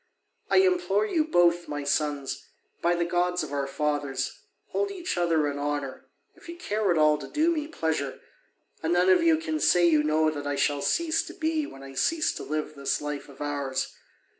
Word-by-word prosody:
I -, -, +4 dB
implore 355 Hz, -, +3 dB
you 310 Hz, +8 st, +1 dB
both, 175 Hz, -, +3 dB
my 145 Hz, -1 st, -4 dB
sons, 145 Hz, -1 st, -1 dB, 0.3 s
by 175 Hz, +1 st, +2 dB
the 170 Hz, 0 st, 0 dB
gods 180 Hz, +1 st, 0 dB
of -, -, -7 dB
our 140 Hz, -1 st, -1 dB
fathers, 145 Hz, -1 st, -2 dB, 0.3 s
hold 405 Hz, 0 st, -1 dB
each 375 Hz, -3 st, -3 dB
other 165 Hz, -4 st, +2 dB
in 145 Hz, 0 st, -3 dB
honour, 145 Hz, -2 st, -3 dB, 0.3 s
if -, -, -16 dB
you 340 Hz, -, -7 dB
care 215 Hz, -, -1 dB
at 175 Hz, -, +3 dB
all 150 Hz, -1 st, +4 dB
to 135 Hz, -, -7 dB
do 315 Hz, -, +2 dB
me 305 Hz, -3 st, -2 dB
pleasure: 160 Hz, -, -2 dB, 0.6 s
and 160 Hz, +1 st, 0 dB
none 180 Hz, +1 st, +4 dB
of 185 Hz, -, +5 dB
you 330 Hz, -1 st, +4 dB
can 315 Hz, -1 st, -3 dB
say 175 Hz, -, +4 dB
you 155 Hz, -3 st, +4 dB
know 155 Hz, +1 st, +2 dB
that 145 Hz, -2 st, -5 dB
I 145 Hz, -, -1 dB
shall 145 Hz, 0 st, +1 dB
cease 330 Hz, -, +1 dB
to -, -, -9 dB
be 315 Hz, -1 st, -1 dB
when 135 Hz, -, -11 dB
I 135 Hz, 0 st, -10 dB
cease 310 Hz, -, +1 dB
to -, -, -7 dB
live 155 Hz, +1 st, -3 dB
this 140 Hz, -2 st, -1 dB
life 150 Hz, -1 st, -5 dB
of 140 Hz, -, -14 dB
ours. 140 Hz, -2 st, -2 dB
160 Hz, 205 wpm, -27 LUFS, -, 0.6 s, of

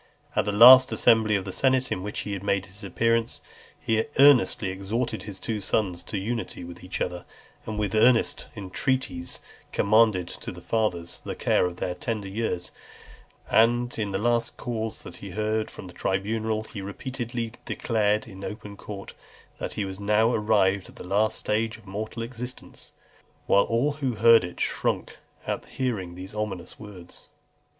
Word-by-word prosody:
At -, -, +2 dB
the 105 Hz, -, 0 dB
last 125 Hz, +5 st, +9 dB
assembly 110 Hz, -2 st, +4 dB
of 95 Hz, -2 st, -1 dB
the 95 Hz, -, -4 dB
senate 130 Hz, +3 st, +2 dB
in 90 Hz, -, -1 dB
which 105 Hz, +2 st, -4 dB
he 100 Hz, -2 st, -4 dB
made 100 Hz, 0 st, 0 dB
his 100 Hz, +3 st, -13 dB
appearance, 115 Hz, +4 st, 0 dB, 0.4 s
he 110 Hz, -1 st, +1 dB
earnestly 135 Hz, -7 st, +5 dB
exhorted 110 Hz, +5 st, -2 dB
his 100 Hz, -3 st, -8 dB
two 110 Hz, 0 st, -3 dB
sons 95 Hz, -4 st, 0 dB
to 105 Hz, -, -4 dB
unity 115 Hz, 0 st, -3 dB
with 85 Hz, +1 st, -10 dB
each 90 Hz, -, -5 dB
other, 90 Hz, 0 st, -2 dB, 0.4 s
and 110 Hz, -1 st, -4 dB
with 105 Hz, -2 st, -1 dB
earnest 115 Hz, +2 st, +3 dB
entreaties 95 Hz, -1 st, -2 dB, 0.3 s
commended 105 Hz, -4 st, +3 dB
to -, -, -7 dB
the -, -, -10 dB
fathers 90 Hz, -7 st, -1 dB
the -, -, -5 dB
care -, -, +2 dB
of 90 Hz, -, -6 dB
their 90 Hz, -, -2 dB
tender 110 Hz, -5 st, -4 dB
years. 95 Hz, -3 st, -3 dB, 0.8 s
And 120 Hz, +2 st, +3 dB
in 105 Hz, -2 st, -1 dB
the 95 Hz, -, -1 dB
last 120 Hz, +2 st, 0 dB
cause 110 Hz, -2 st, -4 dB, 0.2 s
he 100 Hz, -, -8 dB
heard 110 Hz, +3 st, -1 dB
from -, -, -10 dB
the 90 Hz, -, -11 dB
tribunal, 110 Hz, +4 st, -1 dB
he 105 Hz, -2 st, -8 dB
repeatedly 120 Hz, +3 st, -4 dB
declared 110 Hz, 0 st, 0 dB
in 95 Hz, -3 st, -10 dB
open 105 Hz, -1 st, -7 dB
court, 100 Hz, -1 st, -8 dB, 0.5 s
"That -, -, -4 dB
he 105 Hz, -, -2 dB
was 95 Hz, 0 st, -7 dB
now 105 Hz, +3 st, +3 dB
arrived 100 Hz, -3 st, +2 dB
at -, -, -16 dB
the -, -, -9 dB
last 105 Hz, +4 st, +1 dB
stage 110 Hz, +1 st, -1 dB
of 110 Hz, -, -19 dB
mortal 110 Hz, +4 st, -5 dB
existence;" 125 Hz, +1 st, -8 dB, 0.5 s
whilst 100 Hz, -, +4 dB
all 120 Hz, +6 st, +2 dB
who 140 Hz, -4 st, -2 dB
heard 115 Hz, -1 st, +6 dB
it 90 Hz, -1 st, -7 dB
shrunk -, -, -1 dB, 0.3 s
at -, -, -2 dB
hearing 100 Hz, -9 st, -3 dB
these 95 Hz, +2 st, -9 dB
ominous 105 Hz, -5 st, -5 dB
words. 100 Hz, -5 st, -12 dB
105 Hz, 165 wpm, -26 LUFS, 95-115 Hz, 0.8 s, last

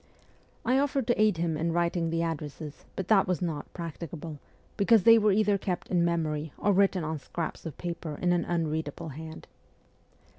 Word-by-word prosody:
I 255 Hz, +3 st, +3 dB
offered 275 Hz, -2 st, +1 dB
to 240 Hz, -2 st, +2 dB
aid 215 Hz, -5 st, +4 dB
him 165 Hz, -1 st, 0 dB
in 165 Hz, +2 st, -1 dB
writing 170 Hz, -1 st, +1 dB
the 165 Hz, 0 st, 0 dB
addresses, 150 Hz, -2 st, -5 dB
but 190 Hz, -, -4 dB
that 195 Hz, -3 st, +5 dB
was 180 Hz, -1 st, 0 dB
not 160 Hz, -5 st, -3 dB
practicable, 165 Hz, -2 st, -7 dB, 0.4 s
because 205 Hz, 0 st, +4 dB
they 230 Hz, +2 st, +8 dB
were 210 Hz, -1 st, +4 dB
either 205 Hz, 0 st, +3 dB
kept 185 Hz, -2 st, -3 dB
in 175 Hz, -2 st, +3 dB
memory 160 Hz, -3 st, -1 dB
or 205 Hz, -, +2 dB
written 190 Hz, -2 st, +3 dB
on 155 Hz, 0 st, -3 dB
scraps 165 Hz, +4 st, -5 dB
of 155 Hz, -, -8 dB
paper 170 Hz, -3 st, -5 dB
in 175 Hz, 0 st, +2 dB
an 175 Hz, -, +1 dB
unread 160 Hz, -2 st, -1 dB
able 160 Hz, +3 st, -7 dB
hand. 160 Hz, +3 st, -8 dB
170 Hz, 185 wpm, -28 LUFS, 160-190 Hz, 0.4 s, they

